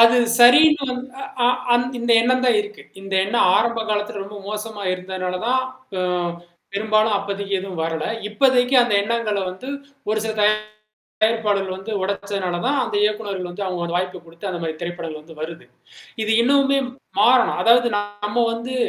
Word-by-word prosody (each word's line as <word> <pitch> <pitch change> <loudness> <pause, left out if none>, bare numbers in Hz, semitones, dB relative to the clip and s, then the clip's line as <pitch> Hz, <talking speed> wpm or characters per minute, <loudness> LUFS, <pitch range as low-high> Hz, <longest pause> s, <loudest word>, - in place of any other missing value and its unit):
அது 230 +1 +7 0.2
சரின்னு 275 +2 +6 0.5
அ - - +5 0.3
ஆம் 245 +1 +2
இந்த 235 0 -2
எண்ணம் 255 +2 +2
தான் 250 - +4
இருக்கு. 415 0 -11 0.2
இந்த 195 0 -5
எண்ணம் 200 -2 +2
ஆரம்ப 230 +1 +1
காலத்துல 210 -1 -2
ரொம்ப 205 +1 -9
மோசமா 210 0 -5
இருந்தனால 185 0 -4
தான், 260 +1 +2 0.4
அ - - 0 0.7
பெரும்பாலும் 215 +1 +2
அப்போதக்கி 200 0 -4
எதுவும் 185 -4 -5
வரல. 160 -1 -2 0.2
இப்போதக்கி 250 +3 +2
அந்த 240 -4 0
எண்ணங்கள 225 -1 -1
வந்து 190 +8 -10 0.4
ஒரு 215 - +1
சில 220 - -2 0.7
தயாரிப்பாளர்கள் 205 -4 -1
வந்து 205 +4 -7
ஒடச்சனாலதான், 200 +5 -2
அந்த 225 -3 -6
இயக்குநர்கள் 205 -4 -2
வந்து 195 +3 -5
அவுங்க 180 -2 -3
ஒரு 170 - -5
வாய்ப்ப 180 0 -3
கொடுத்து, 170 +4 -8
அந்தமாரி 165 -3 -4
திரைப்படங்கள் 170 -3 -5
வந்து 160 +1 -14
வருது. 165 +3 -7 0.6
இது 215 - -1
இன்னமுமே 275 +2 +3 0.4
மாறணும். 245 +4 +4
அதாவது 240 +1 +5
நம்ம 205 +2 -2
வந்து 235 +3 -5
210 Hz, 150 wpm, -21 LUFS, 185-240 Hz, 0.7 s, அது